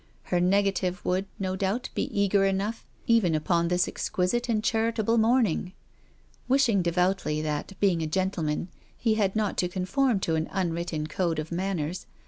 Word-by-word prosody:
Her 180 - 0
nega 195 +2 +3
tive 180 -1 -3
would, 185 +2 0
no 185 -1 -2
doubt, 200 +6 -1
be - - -1
eager 200 -1 +2
enough 195 +3 -1 0.2
even 220 -8 +3
upon 170 +2 +1
this 180 +1 +2
exquisite 240 +7 -1
and 215 -2 +1
charitable 225 0 +1
morning. 220 -6 +2 0.7
Wishing 255 -6 +3
devoutly 180 -2 +1
that, 150 +4 -3
being 185 -5 +2
a 160 - -1
gentleman, 170 -1 -1 0.3
he 225 -2 +1
had 205 -3 +1
not 215 -2 0
to 180 - +2
conform 195 +6 +1
to 165 - 0
an 160 0 -1
unwritten 170 -4 -2
code 165 +1 -1
of 155 +2 -4
manners. 180 -2 -2
190 Hz, 160 wpm, -27 LUFS, 170-210 Hz, 0.7 s, nega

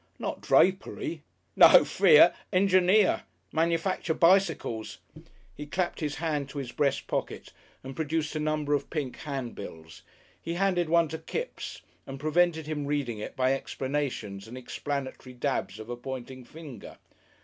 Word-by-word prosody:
"Not - - -4
drapery?" - - +1 0.3
"No - - +8
fear! 460 - +6 0.2
Engineer. 185 +1 +4 0.3
Manufacture 165 +1 0
bicycles." 170 - +2 0.6
He 150 - -8
clapped 175 +3 -2
his 150 -2 -2
hand 150 -4 -2
to 145 - -9
his 130 -4 -4
breast 140 +1 0
pocket - - -4 0.3
and 135 0 -8
produced 160 -1 -2
a - - -1
number 150 -1 0
of 140 -1 -1
pink 145 -6 -4
handbills. 115 - -7 0.4
He 170 - -4
handed 180 -3 +1
one 170 0 +4
to 160 - -5
Kipps 485 +2 -6 0.2
and 135 0 -7
prevented 160 +1 +2
him 150 -2 -3
reading 140 -7 -2
it 105 - -7
by 130 0 +2
explanations 130 -8 -3
and 120 +3 -9
explanatory 130 0 -5
dabs 125 -6 -2
of 110 0 -9
a 120 - -4
pointing 130 0 -7
finger. 150 -1 -11
145 Hz, 140 wpm, -28 LUFS, 130-165 Hz, 0.6 s, No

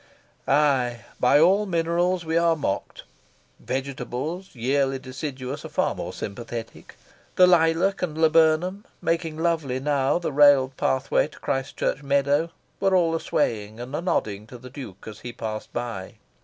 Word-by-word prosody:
Aye, 130 -6 +2
by 135 +3 +5
all 195 +6 +4
minerals 170 +1 0
we 160 0 -1
are 170 0 +4
mocked. 140 -10 -3 0.6
Vegetables, 135 +7 -4
yearly 135 +3 +1
deciduous, 130 +1 -6
are - - -7
far - - 0
more - - -5
sympathetic. 115 +2 -7 0.4
The 185 - +7
lilac 175 +2 +3
and 160 -4 -2
laburnum, 165 +4 +3 0.2
making 165 -2 -1
lovely 160 -6 0
now 135 0 +1
the 170 -3 -3
railed 140 -2 +5
pathway 130 +2 +1
to 150 - -17
Christ 135 0 -3
Church - - -1
meadow, 140 +3 +1 0.3
were 195 -1 +3
all 170 -3 +3
a 165 - 0
swaying 110 -5 -1
and 125 +4 -6
a 155 - -2
nodding 105 - -1
to 125 - -10
the 125 +1 -12
Duke 120 -9 -9
as 105 -1 -8
he 120 - -7
passed 110 -2 -6
by. 115 -6 -5
140 Hz, 155 wpm, -24 LUFS, 125-165 Hz, 0.6 s, The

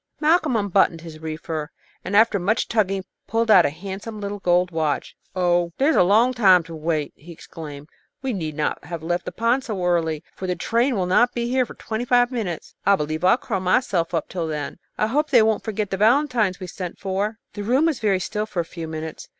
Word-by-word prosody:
Malcolm 310 -3 +3
unbuttoned 195 -5 +2
his 160 -2 -10
reefer, 155 -1 -5 0.3
and, 195 - -3
after 220 -2 +4
much 205 +6 0
tugging, 195 -4 0 0.2
pulled 225 +1 +1
out 185 -5 +7
a - - -1
handsome 195 +7 -7
little 205 0 -4
gold 180 -1 +2
watch. 155 -3 -2 0.2
"Oh, 175 -2 +1
there's 290 +4 +3
a - - +5
long 220 +8 +4
time 190 -7 +5
to 165 0 -9
wait!" 155 -1 -2
he 170 +4 -13
exclaimed. 150 -3 -10 0.4
"We 265 -2 -1
need 160 -6 -4
not 150 0 -2
have 165 0 -6
left 175 +2 -1
the - - -4
pond 235 +4 +1
so 205 -8 -3
early, 165 -3 0
for 185 - -5
the 180 - 0
train 235 +8 +1
will 190 -3 0
not 240 +7 +3
be 235 0 -1
here 255 -1 +1
for - - -11
twenty 220 +2 -4
five 245 0 +3
minutes. 205 -10 -4
I 200 +1 +5
believe 155 -1 -3
I'll 185 +6 +5
curl 225 -6 -3
up - - -4
here - - -7
myself, 185 -10 +1 0.2
till 170 -3 -3
then. 150 +1 -4 0.2
I - - +2
hope 295 +7 0
they 240 -5 +6
won't 220 -1 +1
forget 210 -2 -3
the 195 - -1
valentines 225 -3 +2
we 185 - -6
sent 180 0 -6
for." 200 +3 -2 0.2
The 205 - -5
room 255 +9 +2
was 320 -6 0
very 200 -4 +2
still 210 +3 -3
for 200 -4 -4
a - - -7
few 165 -1 -7
minutes. 160 0 -6
195 Hz, 225 wpm, -23 LUFS, 170-225 Hz, 0.4 s, out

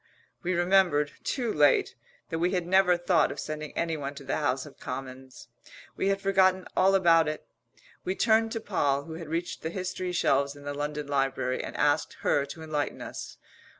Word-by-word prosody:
We 185 -1 -1
remembered, 175 -5 +3
too 240 -5 -1
late, 145 -2 +3 0.4
that 165 - -1
we 175 +3 +1
had 180 -2 0
never 180 0 +4
thought 175 -1 +2
of - - -7
sending 155 -1 -5
anyone 150 -4 -2
to - - -9
the - - -2
House - - 0
of - - -14
Commons. 130 -1 -8 0.5
We - - -1
had 195 0 +1
forgotten 190 -1 +3
all 195 +1 +4
about 165 -4 +5
it. 155 0 -4 0.6
We 185 - -2
turned 225 0 +3
to 225 - -2
Poll, 145 -10 0
who 160 - -9
had 165 -1 -7
reached 165 +3 -3
the 160 - -3
history 185 0 -4
shelves 140 -4 +1
in 145 - -13
the 145 0 -4
London 150 +1 -3
Library, 135 -2 -1
and - - -6
asked 145 -1 +2
her 140 -1 +1
to 160 +3 -9
enlighten 150 -2 -2
us. - - -7
165 Hz, 185 wpm, -28 LUFS, 145-185 Hz, 0.6 s, about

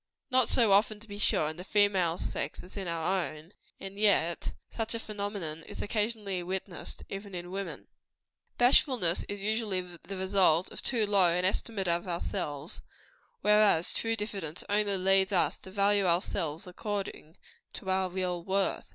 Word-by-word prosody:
Not 255 -1 +4
so 230 -5 +3
often, 210 +2 +4
to 225 - -11
be 205 -1 -8
sure, 155 - +2
in 155 +1 -5
the 180 - -7
female 190 -5 +2
sex, - - -4
as 180 - -14
in 195 -3 -4
our 170 +3 0
own; 155 +5 -9 0.3
and 195 +1 -8
yet 195 -5 +2 0.2
such 225 0 -2
a - - -3
phenomenon 200 -7 -4
is - - -9
occasionally 210 -3 -1
witnessed, 185 0 -5
even 195 -1 -7
in 175 0 -6
woman. 195 +1 -5 0.7
Bashfulness 245 - +4
is 205 - -4
usually 215 -1 0
the 180 +2 -9
result 185 -3 +3
of - - -6
too 230 -5 +2
low 200 -3 +4
an 180 +2 +1
estimate 195 0 0
of 170 +2 0
ourselves; 155 -3 -4 0.6
whereas, 210 -5 +4
true 225 0 0
diffidence 195 -7 -4
only 205 -1 +2
leads 190 +1 +3
us 185 - +2
to - - -11
value 200 0 +2
ourselves 170 0 0
according 190 -4 -5 0.4
to 190 - -4
our 190 0 +1
real 180 -1 -2
worth. 195 +1 0
195 Hz, 160 wpm, -30 LUFS, 175-205 Hz, 0.7 s, Not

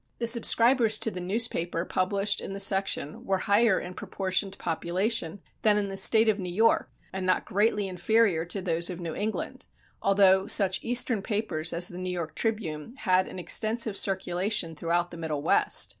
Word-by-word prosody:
The 235 - -2
subscribers 230 0 +3
to 225 - -2
the 185 - -6
newspaper 180 -3 -1
published 195 +3 0
in - - -6
the 195 - -6
section 195 -6 0
were 195 -1 0
higher 205 +2 +2
in 180 - -8
proportion 190 +1 -2
to - - -11
population 175 +2 -2 0.2
than 210 -1 +3
in 200 -1 -1
the 195 - -6
State 220 +3 +3
of 215 -1 +2
New 180 -2 -5
York 225 +5 +2 0.2
and 190 0 -4
not 185 0 0
greatly 205 0 0
inferior 190 -1 +1
to 190 +2 -4
those 170 -1 +1
of 180 -1 -6
New 170 -2 -5
England, 215 +5 -4 0.3
although 195 -1 +3
such 190 -2 +3
eastern 240 -2 +2
papers 190 -7 -2
as 175 +1 0
the 175 - -8
New 185 0 -4
York 170 -3 -4
Tribune 215 - -3
had 185 -5 +1
an - - -9
extensive 215 +5 +1
circulation 190 -2 0
throughout 170 +2 -1
the 170 - -9
Middle 155 -3 -4
West. - - +3
190 Hz, 180 wpm, -27 LUFS, 175-215 Hz, 0.3 s, subscribers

